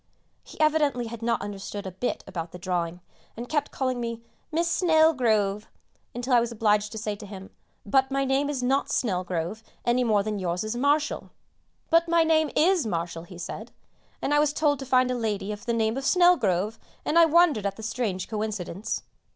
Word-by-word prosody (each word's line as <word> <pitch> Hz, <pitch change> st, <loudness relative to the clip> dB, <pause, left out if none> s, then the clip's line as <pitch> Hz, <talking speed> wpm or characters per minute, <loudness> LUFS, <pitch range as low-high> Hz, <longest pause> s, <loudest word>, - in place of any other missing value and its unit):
He -, -, -14 dB
evidently 300 Hz, -5 st, +2 dB
had 230 Hz, 0 st, -7 dB
not 230 Hz, 0 st, 0 dB
understood 205 Hz, 0 st, -6 dB
a 190 Hz, -, -4 dB
bit 195 Hz, +7 st, -3 dB
about 165 Hz, -2 st, -6 dB
the -, -, -8 dB
drawing, 175 Hz, -1 st, -2 dB, 0.4 s
and 240 Hz, +1 st, -5 dB
kept 295 Hz, 0 st, 0 dB
calling 255 Hz, -2 st, -2 dB
me 230 Hz, -1 st, -4 dB, 0.3 s
"Miss 335 Hz, +2 st, +1 dB
Snelgrove," 255 Hz, -, +3 dB, 0.5 s
until 245 Hz, +2 st, -2 dB
I 240 Hz, -, +7 dB
was 235 Hz, 0 st, -1 dB
obliged 210 Hz, -2 st, +1 dB
to -, -, -6 dB
say 215 Hz, -1 st, -3 dB
to 205 Hz, -, -10 dB
him, 195 Hz, -1 st, -10 dB, 0.3 s
"But 265 Hz, +5 st, +3 dB
my 275 Hz, 0 st, 0 dB
name 270 Hz, +2 st, +1 dB
is 270 Hz, -4 st, -2 dB
not 270 Hz, +3 st, +1 dB
Snelgrove 185 Hz, -2 st, -1 dB, 0.2 s
any 245 Hz, +1 st, +3 dB
more 215 Hz, -4 st, +2 dB
than 210 Hz, -1 st, -3 dB
yours 180 Hz, 0 st, -2 dB
is 215 Hz, +2 st, -3 dB
Marshall." 290 Hz, +4 st, +1 dB, 0.6 s
"But 335 Hz, +1 st, +5 dB
my 335 Hz, 0 st, +4 dB
name 315 Hz, -1 st, +3 dB
is 340 Hz, -4 st, +3 dB
Marshall," 170 Hz, -2 st, -3 dB
he 175 Hz, 0 st, -12 dB
said, 200 Hz, +6 st, -7 dB, 0.5 s
"and 290 Hz, -, +1 dB
I 295 Hz, -, +5 dB
was 295 Hz, -1 st, +2 dB
told 290 Hz, -3 st, +1 dB
to 270 Hz, -, -7 dB
find 255 Hz, -1 st, +3 dB
a -, -, +1 dB
lady 210 Hz, -3 st, -2 dB
of 210 Hz, +3 st, -8 dB
the -, -, +2 dB
name 225 Hz, -1 st, +1 dB
of 270 Hz, -, -3 dB
'Snelgrove,' 225 Hz, -, +3 dB, 0.3 s
and 335 Hz, -, +3 dB
I 335 Hz, -, +8 dB
wondered 320 Hz, -, +4 dB
at 195 Hz, -, -4 dB
the 220 Hz, -, -10 dB
strange 215 Hz, -5 st, -2 dB
coincidence." 210 Hz, -3 st, -3 dB
230 Hz, 195 wpm, -26 LUFS, 205-285 Hz, 0.6 s, I